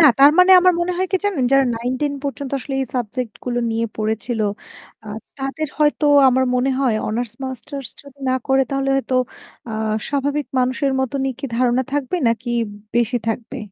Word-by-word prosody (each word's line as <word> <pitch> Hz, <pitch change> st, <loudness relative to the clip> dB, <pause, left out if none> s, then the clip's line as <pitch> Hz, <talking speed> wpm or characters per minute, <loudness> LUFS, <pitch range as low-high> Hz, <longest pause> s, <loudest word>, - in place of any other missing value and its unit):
না, 320 Hz, -, +7 dB
তার 280 Hz, +1 st, +8 dB
মানে 365 Hz, +1 st, +7 dB
আমার 365 Hz, 0 st, +5 dB
মনে 355 Hz, +1 st, 0 dB
হয় 375 Hz, -, +1 dB
কি -, -, +5 dB
জানেন, 375 Hz, -11 st, +1 dB
যারা 275 Hz, 0 st, +5 dB
9-10 255 Hz, +5 st, -2 dB
পর্যন্ত 280 Hz, 0 st, -4 dB
আসলে 270 Hz, +1 st, -6 dB
এই 265 Hz, -, -1 dB
সাবজেক্টগুলো 245 Hz, +1 st, -3 dB
নিয়ে 230 Hz, +1 st, 0 dB
পড়েছিল 220 Hz, +2 st, -2 dB, 0.6 s
আহ 210 Hz, 0 st, -7 dB, 0.2 s
তাদের 275 Hz, +3 st, -3 dB
হয়তো 300 Hz, 0 st, +2 dB, 0.2 s
আমার 260 Hz, +1 st, +3 dB
মনে 255 Hz, +2 st, +1 dB
হয় 255 Hz, -5 st, +2 dB
অনার্স 230 Hz, 0 st, -2 dB
মাস্টার্স 265 Hz, 0 st, -6 dB
যদি 280 Hz, -1 st, -16 dB
না 255 Hz, -, +2 dB
করে 270 Hz, 0 st, +3 dB
তাহলে 275 Hz, 0 st, -1 dB
হয়তো 265 Hz, -1 st, -2 dB, 0.6 s
আহ 220 Hz, 0 st, -1 dB
স্বাভাবিক 285 Hz, +1 st, -1 dB
মানুষের 260 Hz, +2 st, +1 dB
মতনই 270 Hz, +1 st, -1 dB
কি 275 Hz, -, -7 dB
ধারণা 250 Hz, +1 st, +2 dB
থাকবে 290 Hz, +3 st, -1 dB
নাকি 230 Hz, +2 st, -2 dB, 0.5 s
বেশি 240 Hz, +1 st, +2 dB
থাকবে? 230 Hz, +4 st, -4 dB
265 Hz, 170 wpm, -20 LUFS, 240-280 Hz, 0.6 s, তার